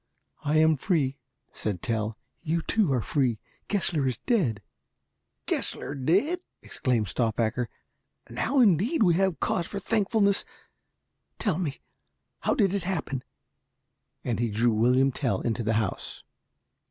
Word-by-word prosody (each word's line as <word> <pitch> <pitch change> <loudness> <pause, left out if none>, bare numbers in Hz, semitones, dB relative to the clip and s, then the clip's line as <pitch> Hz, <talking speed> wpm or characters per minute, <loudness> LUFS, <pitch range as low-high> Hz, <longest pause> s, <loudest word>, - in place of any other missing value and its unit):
"I 150 +1 +2
am 160 -1 +5
free," 145 -4 0 0.3
said 100 -5 -4
Tell; 110 -1 -1 0.2
"you, 165 0 -1
too, 210 -7 +2
are 125 -4 +1
free. 130 -6 +1 0.3
Gessler 175 -9 +1
is 130 - -1
dead." 140 - 0 0.8
"Gessler - - -2
dead!" 190 - +2 0.2
exclaimed 120 -6 0
Stauffacher. 115 +2 0 0.6
"Now 270 +2 +1
indeed 220 - +4
have 190 +2 +3
we - - -22
cause 170 - 0
for 200 - -6
thankfulness. 200 0 +2 0.9
Tell 185 -6 0
me, 150 -7 -3 0.6
how - - +1
did 195 -4 +3
it 200 - 0
happen?" 160 -8 -3 1.0
and 120 -2 -1
he 120 -1 +1
drew 115 +3 +2
William 125 +5 +4
Tell 130 -1 -1
into 115 0 -1
the 110 0 0
house. 110 0 -2
145 Hz, 130 wpm, -27 LUFS, 120-195 Hz, 1.0 s, am